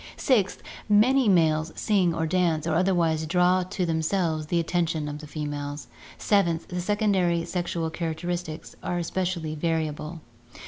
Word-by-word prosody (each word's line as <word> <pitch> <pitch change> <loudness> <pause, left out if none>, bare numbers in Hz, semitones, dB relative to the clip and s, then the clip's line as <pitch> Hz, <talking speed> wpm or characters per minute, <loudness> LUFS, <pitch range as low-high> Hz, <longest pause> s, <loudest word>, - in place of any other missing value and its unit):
Sixth, 215 -9 +1 0.3
many 235 +4 +5
males 160 -3 +3
sing, 195 -5 +2
or 160 - 0
dance, 165 -2 +1
or 165 - 0
otherwise 165 -3 +1
draw 180 +2 +3
to 180 0 -2
themselves 160 -1 0
the 170 +2 +1
attention 165 -2 -1
of 150 0 -5
the 150 - -10
females. 145 -1 -5 0.3
Seventh, 170 -6 +1
the 180 -1 -3
secondary 185 -4 +1
sexual 170 -2 -2
characteristics 170 0 -4
are 175 - -2
especially 175 -2 -2
variable. 155 0 -2
170 Hz, 135 wpm, -26 LUFS, 160-185 Hz, 0.3 s, many